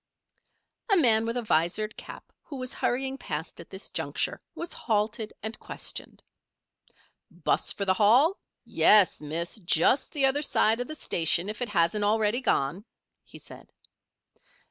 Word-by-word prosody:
A 400 - +5
man 225 -7 +4
with 230 +2 -2
a 245 - -2
visored 205 +3 0
cap - - -11
who 290 - -9
was 255 -1 -4
hurrying 265 +2 -2
past 150 +2 -5
at 170 - -10
this 190 +1 -7
juncture, - - -2
was 340 +1 -6
halted 215 0 -2
and 220 +1 -3
questioned. - - -6 1.1
"'Bus - - -1
for 200 - -4
the 190 - +3
Hall? 245 - +4 0.3
Yes, 205 -7 +4
Miss. 165 +6 -3
Just 185 - +2
the 285 -3 +2
other 270 +2 +2
side 225 -6 +2
of 245 - -2
the 310 - -5
station 170 - +1
if 215 +2 -6
it 245 - -2
hasn't 190 +2 +1
already 215 +3 +1
gone," 150 - 0 0.4
he - - -14
said. - - -14
215 Hz, 150 wpm, -27 LUFS, 185-250 Hz, 1.1 s, A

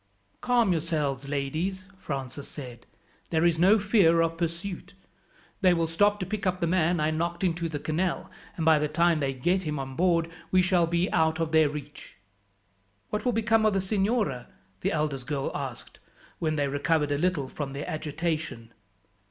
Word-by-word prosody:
"Calm 240 -5 +3
yourselves, 150 -5 -1
ladies," 155 +7 -2
Francis 135 -2 -5
said. 125 -5 -9 0.4
"There 160 0 +2
is 165 -2 +2
no 195 +5 +6
fear 195 -6 +4
of 165 0 0
pursuit. 175 +3 -4 0.7
They 185 -3 +5
will 165 -1 +1
stop 205 +6 +2
to 185 - -2
pick 200 +1 -3
up 185 0 0
the - - +1
man 170 0 +2
I 155 +1 +1
knocked 170 +3 -2
into 170 -2 0
the 155 - -3
canal, 165 +5 -2 0.3
and 165 - -1
by 160 -1 +6
the 150 - 0
time 170 +1 +2
they 135 -2 0
get 175 +9 0
him 150 -4 -3
on 135 -1 -5
board 170 -1 +2 0.2
we 185 0 +4
shall 180 -2 +3
be 170 +2 0
out 160 0 +2
of 165 -1 -1
their 160 -2 +5
reach." 145 0 -9 1.0
"What 210 - -2
will 250 - +3
become 225 0 +2
of 215 -1 +3
the 195 - +2
signora?" 195 - 0 0.3
the - - -1
eldest 150 -4 -2
girl 145 -3 -2
asked, 135 -4 -6 0.4
when 155 -2 0
they 145 -2 +1
recovered 145 +2 +1
a 145 - 0
little 170 -5 0
from 135 0 -5
their 140 +1 -5
agitation. 155 -6 -3
165 Hz, 180 wpm, -27 LUFS, 145-185 Hz, 1.0 s, no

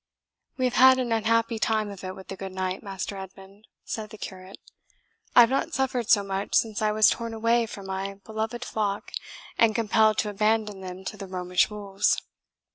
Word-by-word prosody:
"We 255 - +1
have 250 - 0
had 260 +1 +7
an 250 -2 -1
unhappy 230 +1 +1
time 215 -2 0
of 195 -1 -10
it 185 0 -5
with 190 - -12
the 195 - -5
good 190 0 -7
knight, 185 0 -2
Master 195 -1 -5
Edmund," 195 +2 -12 0.2
said 215 -1 -5
the 215 - -11
curate. 190 -1 -9 0.8
"I - - +10
have 235 +1 +5
not 315 +5 0
suffered 250 -3 -1
so 205 -4 +5
much 195 0 -3
since 220 -2 +2
I 215 -1 +2
was 215 0 +5
torn 230 -1 -1
away 230 +1 +2
from 200 -2 -9
my 195 +1 -4
beloved 220 +3 -4
flock, 205 -2 -2 0.5
and 225 -2 +4
compelled 220 -1 +3
to 210 - 0
abandon 210 -1 0
them 185 0 -8
to 210 - -5
the 195 - -7
Romish 180 -1 +1
wolves." 205 -1 0
210 Hz, 195 wpm, -26 LUFS, 195-225 Hz, 0.8 s, I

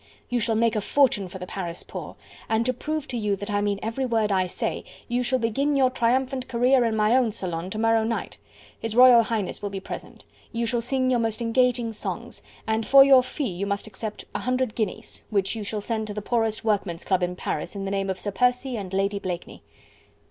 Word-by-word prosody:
you 245 - +1
shall 225 0 0
make 230 0 +2
a 215 - +1
fortune 235 -5 +2
for 185 - -8
the 180 - -6
Paris 175 -2 -5
poor... - - -8 0.3
and 225 +1 +2
to 255 - +1
prove 305 +4 -4
to 250 - -5
you 210 -3 0
that 205 +1 -6
I 205 0 +1
mean 205 -1 0
every 230 +5 -2
word 225 -4 +1
I 185 -1 +2
say, - - -3 0.2
you 245 0 0
shall 260 +1 +1
begin 270 +5 0
your 260 -2 +4
triumphant 255 +2 0
career 250 +1 +3
in 225 -1 0
my 215 +2 +3
own 250 -4 +3
salon 180 -4 -4
to 215 - -5
morrow 225 0 +3
night. 230 +1 -3 0.4
His 225 -1 -4
Royal 250 -1 +8
Highness 220 -4 -2
will 205 - -3
be 195 -1 -5
present. 190 - -9 0.3
You 235 0 -1
shall 235 +1 0
sing 255 +1 +1
your 245 - +3
most 225 -1 -1
engaging 240 0 +1
songs... 215 - -5 0.2
and 220 0 0
for 275 +4 +8
your 270 -2 +7
fee 255 +1 -3
you 185 +3 -3
must 200 0 -2
accept 215 0 -7
a - - -2
hundred 255 -2 0
guineas, 220 -3 -4
which 200 0 0
you 220 - -4
shall 210 +1 -3
send 220 0 -2
to 205 - -6
the 210 - -3
poorest 225 -1 0
workman's 195 -6 -1
club 185 -2 +1
in 180 0 -1
Paris 155 +1 -4
in 195 -1 -4
the 195 - -3
name 195 -1 -1
of 190 - -2
Sir 205 - -3
Percy 250 +3 +1
and 195 -3 -6
Lady 200 +1 0
Blakeney." 180 -3 -6
225 Hz, 230 wpm, -25 LUFS, 200-250 Hz, 0.4 s, Royal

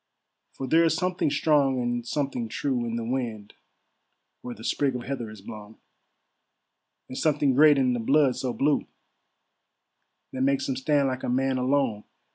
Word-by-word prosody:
For 135 - -6
there's 165 +4 +3
something 180 -4 0
strong 140 -3 +2
and 120 0 -2
something 135 -5 -2
true 125 0 -2
In 115 - -3
the 115 - -3
wind 115 -4 -4 0.9
where 120 -1 -7
the 110 - -13
sprig 135 +1 0
of 125 - -4
heather 125 -4 -5
is 110 -2 -12
blown; 105 0 -10 1.3
And 130 - -9
something 145 -2 +1
great 150 +2 +6
in 130 -2 +2
the 120 - -2
blood 135 +3 +3
so 130 - -3
blue, 145 +4 0 1.5
That 130 - -4
makes 135 0 +1
him 135 - -1
stand 140 +1 +1
like 130 -1 -3
a - - -3
man 130 +1 0
alone. 125 -5 0
130 Hz, 160 wpm, -26 LUFS, 120-140 Hz, 1.5 s, great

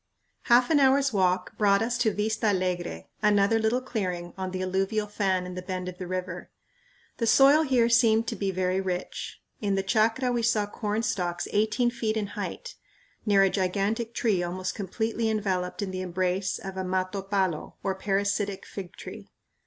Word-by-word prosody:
Half 245 +4 +5
an 300 - +5
hour's 270 -1 +4
walk 185 -2 +1
brought 200 0 +4
us 240 +2 -1
to 225 -3 +3
Vista 215 +2 -1
Alegre, 180 - -1 0.2
another 210 +1 +3
little 225 +3 +1
clearing 180 -9 -3
on 190 -1 -4
an 185 - -4
alluvial 195 +3 0
fan 195 -3 0
in 180 - -6
the 180 - -5
bend 185 0 -4
of 180 +1 -7
the 180 - -5
river. 180 -1 -4 0.7
The 230 - 0
soil 275 +6 +6
here 255 -6 +3
seemed 230 -1 +4
to - - -3
be 195 - -2
very 185 0 0
rich. 185 -1 -5 0.2
In 200 -2 +1
the 195 - 0
chacra 225 +5 +2
we 240 -1 0
saw 225 -2 +2
corn 210 +1 -3
stalks 180 -6 -2
eighteen 220 +4 +2
feet 225 -3 -2
in 205 -2 -2
height, - - -6 0.5
near 200 -1 +5
a 195 - +3
gigantic 205 +5 -1
tree 205 -6 +1
almost 185 +1 -3
completely 220 +3 -2
enveloped 195 -3 -1
in 190 - -4
the 185 0 -4
embrace 185 +1 -1
of 190 -1 -7
a 190 - -2
mato 185 +1 -1
palo, 190 -4 -1
or 195 0 0
parasitic 200 +1 -1
fig 190 -2 -8
tree. - - -10
200 Hz, 180 wpm, -27 LUFS, 185-225 Hz, 0.7 s, soil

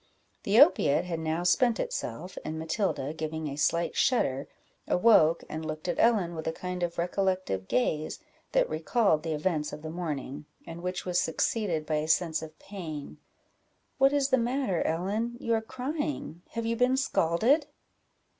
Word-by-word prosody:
The 205 +4 +4
opiate 180 - +5
had 170 -2 -3
now 160 +2 -1
spent 225 +6 +3
itself, 165 +11 -4
and 155 - -4
Matilda, 160 - -1
giving 160 0 -4
a 140 - -4
slight 170 +3 +1
shudder, 140 - +1 0.4
awoke, 180 -6 +5
and 160 +1 -5
looked 155 +1 -5
at 175 - -1
Ellen 205 -7 +3
with 160 -1 -5
a - - +1
kind 180 +2 -5
of 175 -1 -2
recollective 180 - -1
gaze, 150 +5 0 0.3
that - - +3
recalled 215 - +1
the 160 - -2
events 150 -1 -1
of 150 - -8
the 155 - -5
morning, 150 -4 -4 0.2
and 165 0 -8
which 180 0 -3
was 180 -1 +1
succeeded 165 -1 0
by 155 -1 0
a 150 +1 -2
sense 160 -1 +2
of 155 -1 -9
pain. 160 -8 -7 0.8
"What 270 +1 +6
is 285 -1 +2
the 260 -2 +4
matter, 240 -6 0
Ellen? 205 +8 -1
you 230 - 0
are 225 - +2
crying 260 - -4
have 230 0 -3
you 230 +1 0
been 250 +2 +3
scalded?" 265 - +2
175 Hz, 165 wpm, -29 LUFS, 155-230 Hz, 0.8 s, What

